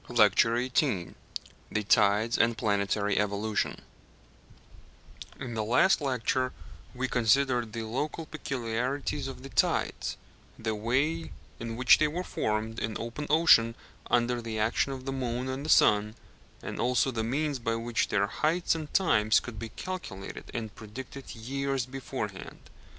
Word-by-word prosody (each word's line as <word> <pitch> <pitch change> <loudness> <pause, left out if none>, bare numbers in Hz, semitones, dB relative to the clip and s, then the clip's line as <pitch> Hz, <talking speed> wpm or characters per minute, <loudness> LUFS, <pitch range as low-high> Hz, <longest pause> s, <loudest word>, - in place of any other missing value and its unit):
LECTURE 120 +2 +4
XVIII 100 - +1 0.6
THE 105 - 0
TIDES, 105 +2 +3
AND 115 0 +3
PLANETARY 100 -1 +1
EVOLUTION 105 +1 -1 1.6
In 125 -3 -5
the 110 -1 -1
last 140 - +4
lecture 130 -1 0 0.4
we 130 +1 -1
considered 120 0 +2
the 115 0 -4
local 145 +8 -3
peculiarities 135 0 -3
of 135 -1 -8
the 135 - -8
tides, - - 0 0.4
the 110 -1 -2
way 135 +10 0 0.3
in 115 -1 -4
which 125 0 +6
they 155 - +4
were 170 +4 -3
formed 110 -5 -2
in 110 - -2
open 120 +6 -5
ocean 145 -8 +5 0.3
under 120 0 +2
the 115 -1 -4
action 110 +5 +1
of 130 -1 -6
the 135 - -2
moon 125 -1 -2
and 130 +1 -3
the 155 - -5
sun, 105 -3 +4 0.5
and - - -5
also 125 +2 +2
the 115 -2 -2
means 140 +4 -1
by 115 -1 -1
which 115 +1 0
their 100 0 +2
heights 160 - +1
and 155 -2 -5
times 110 - +4
could 115 -4 -8
be 115 0 -5
calculated 110 - -7
and 110 -3 -5
predicted 130 +5 -9
years 135 +2 -2
beforehand. 130 -7 -6
120 Hz, 145 wpm, -29 LUFS, 110-135 Hz, 1.6 s, which